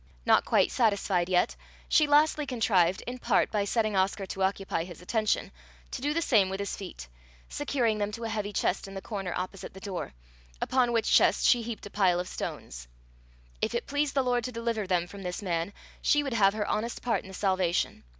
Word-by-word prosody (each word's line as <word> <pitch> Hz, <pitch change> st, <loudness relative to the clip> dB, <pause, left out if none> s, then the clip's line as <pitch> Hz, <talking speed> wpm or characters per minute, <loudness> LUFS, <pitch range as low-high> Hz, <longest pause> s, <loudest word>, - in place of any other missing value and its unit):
Not -, -, +4 dB
quite -, -, +3 dB
satisfied 200 Hz, -6 st, +1 dB
yet, 180 Hz, -1 st, +2 dB, 0.3 s
she 305 Hz, -, +4 dB
lastly 300 Hz, 0 st, +3 dB
contrived, 195 Hz, -8 st, +2 dB
in 250 Hz, +1 st, -5 dB
part -, -, +2 dB
by 205 Hz, -2 st, 0 dB
setting 215 Hz, 0 st, 0 dB
Oscar 195 Hz, +1 st, +1 dB
to 190 Hz, -, -6 dB
occupy 190 Hz, -3 st, 0 dB
his 175 Hz, -2 st, -10 dB
attention, 215 Hz, +4 st, 0 dB, 0.4 s
to -, -, -5 dB
do 290 Hz, +2 st, 0 dB
the 335 Hz, +2 st, 0 dB
same 210 Hz, -9 st, +4 dB
with 190 Hz, +1 st, -4 dB
his 200 Hz, -, -3 dB
feet, 180 Hz, -, -8 dB, 0.4 s
securing 220 Hz, -, 0 dB
them 205 Hz, 0 st, -1 dB
to 230 Hz, +1 st, -6 dB
a 225 Hz, -, -2 dB
heavy 210 Hz, -2 st, -2 dB
chest 195 Hz, -1 st, -1 dB
in 195 Hz, -, -9 dB
the 195 Hz, -, -5 dB
corner 195 Hz, -5 st, -4 dB
opposite 185 Hz, +1 st, -5 dB
the -, -, -9 dB
door, 190 Hz, -, -5 dB, 0.5 s
upon 250 Hz, -2 st, +2 dB
which 230 Hz, -1 st, +1 dB
chest -, -, +4 dB
she 245 Hz, -, +5 dB
heaped 230 Hz, -2 st, -6 dB
a 205 Hz, -, -9 dB
pile 185 Hz, -4 st, +3 dB
of 180 Hz, -, -3 dB
stones. -, -, -6 dB, 0.7 s
If -, -, 0 dB
it 235 Hz, -, -1 dB
pleased 290 Hz, 0 st, -1 dB
the 270 Hz, -, +3 dB
Lord 245 Hz, -1 st, +1 dB
to 255 Hz, -, -3 dB
deliver 230 Hz, -3 st, -2 dB
them 180 Hz, -2 st, +1 dB
from 195 Hz, +3 st, -10 dB
this 180 Hz, +2 st, -5 dB
man, 170 Hz, 0 st, -1 dB, 0.3 s
she 295 Hz, 0 st, +3 dB
would 275 Hz, -3 st, -3 dB
have 200 Hz, -3 st, +4 dB
her 210 Hz, -1 st, -2 dB
honest 230 Hz, +3 st, -2 dB
part 240 Hz, -, +1 dB
in -, -, -14 dB
the 190 Hz, -, -9 dB
salvation! 185 Hz, -3 st, 0 dB
205 Hz, 210 wpm, -28 LUFS, 190-235 Hz, 0.7 s, she